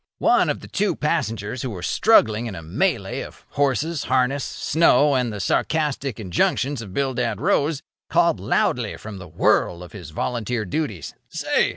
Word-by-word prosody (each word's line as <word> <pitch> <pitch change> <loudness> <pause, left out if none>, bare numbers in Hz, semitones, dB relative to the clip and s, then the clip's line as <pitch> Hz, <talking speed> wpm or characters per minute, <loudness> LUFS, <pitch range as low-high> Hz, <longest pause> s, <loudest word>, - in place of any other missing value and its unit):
One - - +3
of - - -2
the - - -10
two 205 +1 0
passengers 120 -8 -2
who 130 - -3
were 90 -6 -7
struggling 115 - +3
in 105 - -6
a 85 - -8
melée 80 - -1
of - - -13
horses, 145 +3 0
harness, 130 +2 +1
snow, 150 -3 +3
and 125 -3 +1
the 105 - -6
sarcastic 140 - 0
injunctions 115 +7 0
of 105 -4 -9
Bildad 125 -3 -1
Rose, 145 +2 +1 0.3
called - - +3
loudly - - 0
from 105 -3 -8
the 90 - -9
whirl 85 +1 +1
of 90 - -11
his 90 -7 -9
volunteer 115 +5 -2
duties: 100 - -3 0.2
"Say! - - +1
125 Hz, 165 wpm, -23 LUFS, 100-145 Hz, 0.3 s, One